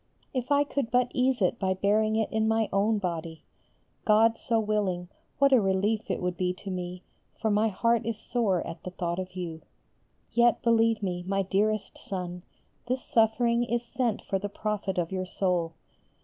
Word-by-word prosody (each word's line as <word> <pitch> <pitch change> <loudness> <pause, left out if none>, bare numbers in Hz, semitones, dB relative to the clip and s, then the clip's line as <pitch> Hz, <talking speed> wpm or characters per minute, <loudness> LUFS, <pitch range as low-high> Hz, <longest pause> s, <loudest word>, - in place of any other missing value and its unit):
If 255 +1 -3
I 285 0 +5
could 280 -4 -2
but 250 +1 +2
ease 255 -3 +2
it 185 +6 +1
by 190 -1 +1
bearing 215 +3 +2
it 220 -1 0
in 220 0 +1
my 225 -1 +2
own 210 +3 +2
body! 165 -4 -4 0.6
God 225 +1 +5
so 230 -1 +1
willing, 200 -5 -1 0.3
what 275 0 +4
a 250 - +6
relief 200 +3 0
it - - -2
would 180 0 -1
be 180 -1 0
to 195 +2 -8
me, 180 0 -5 0.4
for 220 - +1
my 210 +2 +3
heart 230 +3 +1
is 225 -1 -2
sore 220 -6 0
at 165 -1 -7
the - - -6
thought 175 -1 -3
of 185 0 -6
you. 165 -3 -5 0.7
Yet, 235 0 +3
believe 230 -2 +3
me, 180 -2 -2
my 195 0 +1
dearest 210 +2 0
Son, 180 -5 -5 0.5
this 255 +1 -1
suffering 235 +1 +2
is 240 0 -1
sent 235 -3 -1
for 195 - -1
the 205 +1 -4
profit 205 -2 -3
of 175 -1 -1
your 185 -1 -2
soul. 180 -3 0
210 Hz, 185 wpm, -28 LUFS, 185-230 Hz, 0.7 s, a